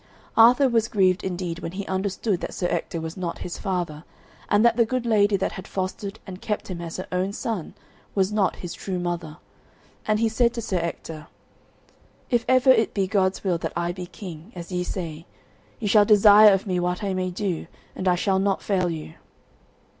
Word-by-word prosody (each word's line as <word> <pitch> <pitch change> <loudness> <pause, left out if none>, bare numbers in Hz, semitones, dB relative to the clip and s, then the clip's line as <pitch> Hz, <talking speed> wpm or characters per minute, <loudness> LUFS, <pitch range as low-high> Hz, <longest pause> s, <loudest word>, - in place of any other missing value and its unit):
Arthur 245 +4 +6
was 230 -3 +2
grieved 190 -3 +2
indeed 175 -2 -3
when 165 -1 -6
he 195 +1 -5
understood 190 +1 -1
that - - -5
Sir 180 - -2
Ector 165 - -2
was 160 0 -6
not 180 -3 -4
his 175 - -6
father, 175 -6 -3 0.5
and 210 +2 +4
that 235 -1 +5
the 235 - +4
good 250 +1 -2
lady 205 -3 +3
that 190 - -1
had 190 - -8
fostered 195 +2 -4
and 185 -1 -9
kept 215 -4 -3
him 175 -2 -5
as 165 -1 -6
her 185 - -5
own 185 +2 0
son 210 -6 -4 0.4
was 195 0 +2
not 205 -4 +1
his 175 - -7
true 190 -2 -4
mother, 175 -3 -4 0.7
and 215 0 +2
he 230 - +3
said 235 +2 +1
to - - -3
Sir 205 -5 -2
Ector, 165 -2 -5 1.0
"If 240 -1 +2
ever 260 0 +5
it 225 -4 +2
be 195 -2 +2
God's 190 -1 0
will 180 -4 0
that - - -4
I 170 +1 -1
be 180 0 -7
king, 175 -1 -10
as 175 +1 -8
ye 180 0 -1
say, 170 -3 -6 0.5
ye 220 - -2
shall 210 +1 +6
desire 210 0 +8
of 195 -1 +1
me 185 -3 0
what 180 +2 -1
I 195 -1 -1
may 185 0 -1
do, 180 -3 -3 0.3
and 185 - -3
I 180 - +4
shall 190 +1 +1
not 195 0 0
fail 185 -3 +1
you." 160 -1 -6
190 Hz, 205 wpm, -24 LUFS, 175-210 Hz, 1.0 s, desire